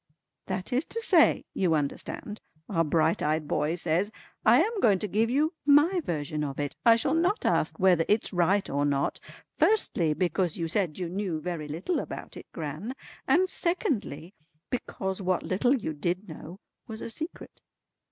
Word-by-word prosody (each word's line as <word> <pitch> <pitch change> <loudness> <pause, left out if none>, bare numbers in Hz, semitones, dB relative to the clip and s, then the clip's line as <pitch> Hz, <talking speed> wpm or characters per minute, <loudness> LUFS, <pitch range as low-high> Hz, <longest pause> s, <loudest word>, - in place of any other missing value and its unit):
"That 185 +5 -3
is 260 +4 +2
to 460 - -5
say, 365 -8 +4
you 175 -4 +2
understand," 150 +8 -4 0.3
our 165 -5 +1
bright 160 +1 +1
eyed 155 0 0
boy 150 +3 0
says, 175 +3 0 0.3
"I 235 +4 +6
am 425 +6 +1
going 205 - +4
to 210 - -3
give 220 +4 +1
you 300 +7 +1
my 295 +6 +5
version 150 - -3
of 140 -1 -4
it. 145 -1 -3
I 230 -1 +7
shall 230 - 0
not 355 +6 +1
ask - - +1
whether 185 -5 +4
it's 210 0 +1
right 185 +3 +2
or 140 +1 -1
not, 140 -1 0 0.4
firstly 175 - +3
because 180 -1 0
you 165 -2 -2
said 170 -3 -1
you 180 -2 -3
knew 180 -2 -3
very 165 -2 -4
little 170 - -2
about - - -7
it, - - -10
Gran, 160 - -5 0.3
and 370 +1 +4
secondly 230 - -2 0.4
because 190 -6 -3
what 185 -1 0
little 245 +8 +2
you 180 -11 -3
did 175 +7 -2
know 165 +2 -9 0.3
was 220 -2 -7
a - - -5
secret." 315 +8 -7
185 Hz, 170 wpm, -28 LUFS, 160-240 Hz, 0.4 s, I